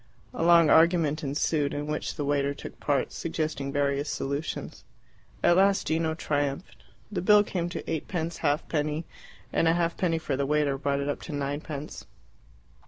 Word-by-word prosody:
A -, -, -4 dB
long 170 Hz, -1 st, +6 dB
argument 160 Hz, -2 st, +4 dB
ensued, 145 Hz, +1 st, 0 dB
in 145 Hz, 0 st, -3 dB
which 150 Hz, 0 st, -3 dB
the 145 Hz, -, -3 dB
waiter 140 Hz, 0 st, 0 dB
took -, -, -10 dB
part, 140 Hz, -3 st, 0 dB
suggesting 155 Hz, -4 st, -3 dB
various 140 Hz, +1 st, 0 dB
solutions. 140 Hz, +3 st, -4 dB, 0.6 s
At 175 Hz, -, +5 dB
last 195 Hz, +1 st, +3 dB
Gino 160 Hz, 0 st, 0 dB
triumphed. 145 Hz, +1 st, -3 dB, 0.3 s
The 205 Hz, -, -2 dB
bill 205 Hz, +3 st, +6 dB
came 175 Hz, -4 st, -3 dB
to -, -, -6 dB
eightpence 165 Hz, +1 st, -3 dB
halfpenny, 150 Hz, +1 st, -1 dB, 0.5 s
and 165 Hz, -, +2 dB
a 165 Hz, -, +5 dB
halfpenny 170 Hz, 0 st, 0 dB
for 150 Hz, -4 st, -2 dB
the 140 Hz, +1 st, -1 dB
waiter 145 Hz, -2 st, +1 dB
brought 140 Hz, 0 st, 0 dB
it 140 Hz, -, -3 dB
up 145 Hz, -, -2 dB
to 160 Hz, -, -6 dB
ninepence. 145 Hz, +1 st, -5 dB
150 Hz, 160 wpm, -27 LUFS, 145-165 Hz, 0.6 s, long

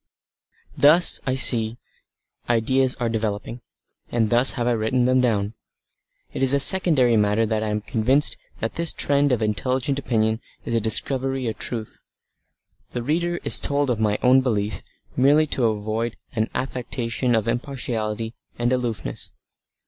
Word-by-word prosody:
Thus, 160 Hz, +5 st, +4 dB
I 130 Hz, -, +1 dB
see, 115 Hz, -3 st, +4 dB, 0.7 s
ideas 130 Hz, +3 st, +1 dB
are 120 Hz, -, -2 dB
developing, 110 Hz, +1 st, -4 dB, 0.5 s
and 115 Hz, -3 st, 0 dB
thus 120 Hz, +3 st, +5 dB
have 120 Hz, -, -3 dB
I 120 Hz, -, +1 dB
written 120 Hz, +2 st, 0 dB
them 130 Hz, 0 st, +3 dB
down. 105 Hz, -4 st, 0 dB, 0.8 s
It -, -, -5 dB
is 135 Hz, +1 st, +3 dB
a -, -, +2 dB
secondary 145 Hz, -8 st, +4 dB
matter 105 Hz, +2 st, +2 dB
that 110 Hz, 0 st, -1 dB
I 110 Hz, -, -2 dB
am 105 Hz, 0 st, -2 dB
convinced 130 Hz, +8 st, +2 dB, 0.3 s
that 115 Hz, -, -3 dB
this 170 Hz, 0 st, 0 dB
trend 145 Hz, 0 st, +1 dB
of 120 Hz, -3 st, 0 dB
intelligent 130 Hz, +6 st, -1 dB
opinion 110 Hz, -3 st, -1 dB, 0.2 s
is -, -, -3 dB
a 115 Hz, -, +1 dB
discovery 130 Hz, +4 st, +1 dB
of 110 Hz, -, -4 dB
truth. 115 Hz, -3 st, -6 dB, 0.9 s
The 120 Hz, -, -5 dB
reader 170 Hz, +5 st, -1 dB
is -, -, +3 dB
told 140 Hz, -2 st, +1 dB
of 115 Hz, -, -2 dB
my 105 Hz, -1 st, +1 dB
own 130 Hz, +1 st, +5 dB
belief 105 Hz, -6 st, -2 dB, 0.3 s
merely 145 Hz, +4 st, +4 dB
to 120 Hz, -3 st, +1 dB
avoid 110 Hz, +2 st, -3 dB, 0.2 s
an 110 Hz, 0 st, -1 dB
affectation 125 Hz, -1 st, -2 dB
of 110 Hz, -1 st, -1 dB
impartiality 115 Hz, -3 st, -3 dB, 0.2 s
and 120 Hz, +1 st, 0 dB
aloofness. 115 Hz, -, -4 dB
120 Hz, 150 wpm, -22 LUFS, 110-130 Hz, 0.9 s, thus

